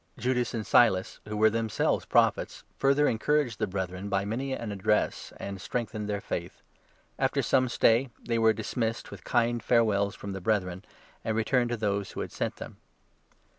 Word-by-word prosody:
Judas 125 0 0
and 110 -2 -3
Silas, 95 -6 +3
32 - - -11
who 105 - -3
were 110 +1 +5
themselves 115 -1 0
Prophets, - - +2
further 140 +2 +3
encouraged 130 0 +1
the 110 - 0
Brethren 95 0 -4
by 100 -1 0
many 125 +6 -3
an 115 -4 -3
address, 100 +1 0
and 100 -1 -6
strengthened 110 -3 -3
their 100 -1 -1
faith. - - -5 0.6
After - - +1
some 130 -1 +2
stay, 120 +2 +3
they 115 -1 -1
were 110 0 +5
dismissed 110 +1 -3
with - - -10
kind 120 0 +1
farewells 105 -3 +2
from 100 - -7
33 - - -4
the 95 - -6
Brethren, 95 -2 -1 0.4
and 110 -1 -1
returned 120 +2 +2
to 120 - -1
those 100 -2 -1
who - - -4
had - - -5
sent - - -3
them. - - -9
110 Hz, 180 wpm, -28 LUFS, 100-120 Hz, 0.6 s, were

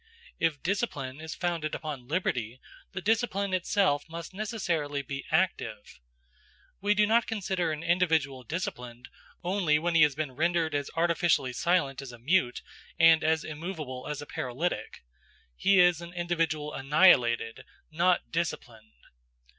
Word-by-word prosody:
If 160 -4 0
discipline 155 - -2
is 160 0 -6
founded 170 -4 -2
upon 145 -6 -6
liberty, 125 - -2 0.3
the 190 -1 -6
discipline 205 -3 0
itself 180 -4 +1
must 170 +2 -7
necessarily 175 -9 -2
be 140 +1 -6
active. - - -1 0.8
We 205 +1 +2
do 210 0 +4
not 230 +2 +3
consider 190 -6 -1
an 155 +1 -4
individual 160 -6 +1
disciplined 125 -5 -5 0.3
only 175 -4 +2
when 170 +3 -1
he 165 - +5
has 150 -3 +5
been 150 -2 -3
rendered 165 +3 0
as 145 -1 -1
artificially 165 -5 +2
silent 140 -3 +1
as 135 -2 -8
a 120 - -11
mute 130 +1 +1 0.3
and 165 -1 +6
as 160 0 +2
immovable 155 -5 -6
as 150 -1 -4
a - - -10
paralytic. 135 - -4 0.5
He 195 - +4
is 175 -2 +5
an 170 +1 -9
individual 165 -4 -1
annihilated, 135 -6 +3 0.3
not 175 +2 +1
disciplined. 120 - -4
160 Hz, 140 wpm, -28 LUFS, 140-180 Hz, 0.8 s, and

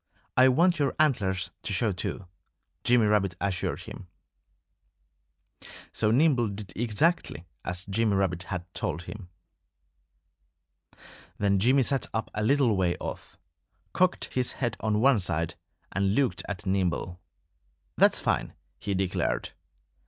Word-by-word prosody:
I 130 +1 +7
want 170 +6 +3
your 140 -2 +1
antlers 95 - +1
to - - -2
show 105 +3 +2
too," 95 +1 -4 0.6
Jimmy 120 -2 +4
Rabbit 100 -4 +2
assured 95 -3 -2
him. 95 - -10 1.8
So 105 - +1
Nimble 125 -1 +3
did 100 0 -7
exactly 120 - 0 0.2
as 90 +2 -3
Jimmy 105 +1 +1
Rabbit 90 -3 0
had 90 -3 -3
told 85 +4 -3
him. 95 0 -9 2.1
Then 100 -1 +2
Jimmy 130 +6 +4
sat 135 +1 0
up 110 - -2
a 105 - -2
little 125 -1 +3
way 90 -2 +1
off, - - -7 0.6
cocked 185 0 +1
his 125 -1 +1
head 120 -4 -2
on 105 -1 0
one 135 -2 +5
side, 85 -3 0 0.4
and 100 +1 +1
looked 135 -3 +1
at 100 -3 -5
Nimble. 90 -1 -1 0.7
"That's - - +4
fine!" - - -1 0.2
he 100 -2 -2
declared. 95 -10 -1
105 Hz, 130 wpm, -27 LUFS, 95-125 Hz, 2.1 s, I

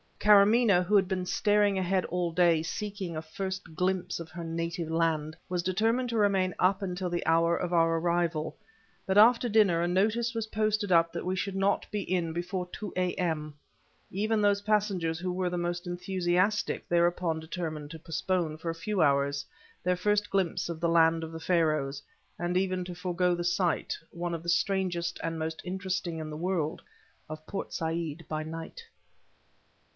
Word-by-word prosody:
Karamaneh 210 -1 +5
who 205 +4 +1
had 195 -2 +5
been 185 -1 -2
staring 205 +1 +2
ahead 185 0 +1
all 175 -1 -1
day, 170 -2 +4
seeking 200 -2 -4
a 155 - -3
first 190 0 -5
glimpse 185 0 -1
of 165 -1 -7
her 170 +1 -7
native 165 0 -3
land, 160 -2 0
was 180 -1 0
determined 225 +7 +1
to 230 - -1
remain 195 -3 +2
up 190 +2 +3
until 180 -1 -3
the 175 0 -2
hour 165 +1 +3
of 180 0 -3
our 165 -1 +3
arrival, 170 -2 0 0.5
but 190 +1 +1
after 235 +3 +6
dinner 205 -6 +4
a 175 - +1
notice 220 +6 +1
was 225 -1 -2
posted 215 -2 0
up 165 -1 +4
that 170 - -5
we 185 +1 0
should 195 +1 -3
not 195 +1 +1
be 210 - -1
in 175 -3 -1
before 180 +2 -3
two 210 -2 -6
A.M. 170 -4 -1 0.6
Even 215 +3 0
those 205 -1 +3
passengers 200 -6 0
who 180 +1 -2
were 180 0 -1
the 175 - -2
most 175 0 -2
enthusiastic 185 +3 0
thereupon 170 -1 +1
determined 160 -2 -5
to 165 - -8
postpone, 165 0 -2
for 165 +1 -5
a - - -7
few 205 +3 -1
hours, 140 0 +1 0.4
their 180 0 +1
first 210 +2 +1
glimpse 190 -3 0
of 165 -2 -4
the 170 0 +1
land 165 0 +4
of 160 - -6
the 165 - -7
Pharaohs 155 -5 +1 0.4
and 175 +1 0
even 185 -1 0
to 180 - -6
forego 180 0 0
the 175 - -3
sight 175 0 0
one 175 0 -4
of 165 - -6
the 170 - -3
strangest 180 -1 0
and 165 0 -2
most 160 0 -4
interesting 185 -2 -3
in 155 -1 -5
the 150 - -5
world 165 -2 -1 0.5
of 155 0 -8
Port 195 - -5
Said 165 -1 -3
by 155 0 -2
night. 165 - -7
175 Hz, 180 wpm, -29 LUFS, 165-195 Hz, 0.6 s, after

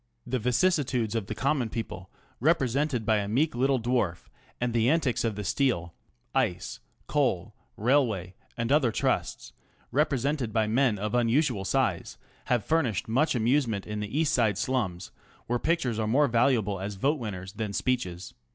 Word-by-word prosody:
The 130 +1 -1
vicissitudes 125 - +1
of 110 -4 -2
the 110 - -4
"common 135 -3 0
people," 95 -5 -6 0.3
represented 135 -4 +1
by 110 0 +3
a 100 -1 -1
meek 135 +9 +1
little 130 +2 +2
dwarf, 115 -7 -1 0.3
and 120 -1 -1
the 115 +1 +3
antics 150 -6 +1
of 115 -3 -1
the 105 - -4
steel, 95 -9 0 0.4
ice, - - -1 0.3
coal, - - 0 0.2
railway, 110 -7 +1 0.2
and 115 +2 -1
other 140 -5 +4
trusts, - - -1 0.4
represented 140 -3 0
by 110 0 +2
men 115 0 +2
of 105 +1 -3
unusual 120 -3 +2
size, - - 0 0.3
have 120 -5 +1
fur 165 +1 +3
nished 115 - -2
much 130 +7 +2
amusement 120 -3 +1
in 105 0 -4
the 105 +8 -2
east 160 -1 +2
side 110 -6 +2
slums, 100 -6 -2 0.3
where 120 +1 -1
pictures 135 -9 0
are 110 - 0
more 140 +6 +4
valuable 115 -5 +2
as 100 +2 -4
vote 140 +10 +1
winners 95 -5 -6
than 110 -1 -3
speeches. 95 - -2
120 Hz, 160 wpm, -28 LUFS, 105-135 Hz, 0.4 s, other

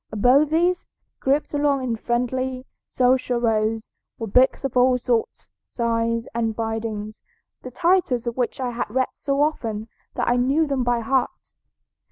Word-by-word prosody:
Above 255 +8 +4
these, 350 +3 +1 0.3
grouped 280 +3 0
along 285 -2 +1
in 240 -3 -1
friendly, 255 +3 -2 0.2
social 250 -1 +1
rows, 225 -1 0 0.3
were 225 - -4
books 250 +7 +3
of 270 -2 -3
all 250 0 +4
sorts, 240 -2 -2 0.2
sizes, 230 -1 -1
and 225 -1 -1
bindings, 220 -1 -4 0.4
the 255 - -7
titles 335 -4 +1
of 235 -1 -3
which 250 0 -2
I 250 -2 -2
had 240 -1 -3
read 260 +4 0
so 280 +1 0
often 225 -8 -2 0.3
that - - -1
I 240 - +3
knew 275 +6 +2
them 275 -3 -1
by 240 -1 +1
heart. 260 +3 -1
245 Hz, 155 wpm, -23 LUFS, 230-265 Hz, 0.4 s, Above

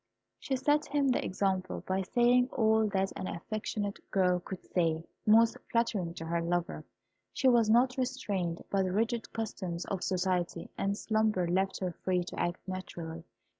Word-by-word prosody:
She 270 - -1
set 295 +3 +2
him 285 -1 +1
the 250 - +1
example, 185 -1 -1
by 190 +1 0
saying 245 +5 +3
all 220 -1 +3
that 195 -1 0
an 185 - -4
affectionate 205 +2 -3
girl 180 -2 +2
could 185 +1 -8
say, 165 -2 0 0.2
most 225 +2 +6
flattering 210 -8 0
to 165 - -6
her 170 +1 0
lover. 175 +1 -1 0.5
She 270 - +1
was 235 -3 +5
not 250 +3 +4
restrained 205 -10 -2
by 195 - +2
the 185 -1 0
rigid 225 +3 0
customs 185 -6 -4
of 190 -2 -3
society, 180 -2 -1
and 200 +1 -1
slumber 215 -5 +1
left 190 +3 0
her 185 -1 -1
free 180 +1 -1
to 175 - -7
act 175 +2 -2
naturally. 170 -3 -6
195 Hz, 165 wpm, -31 LUFS, 180-225 Hz, 0.5 s, most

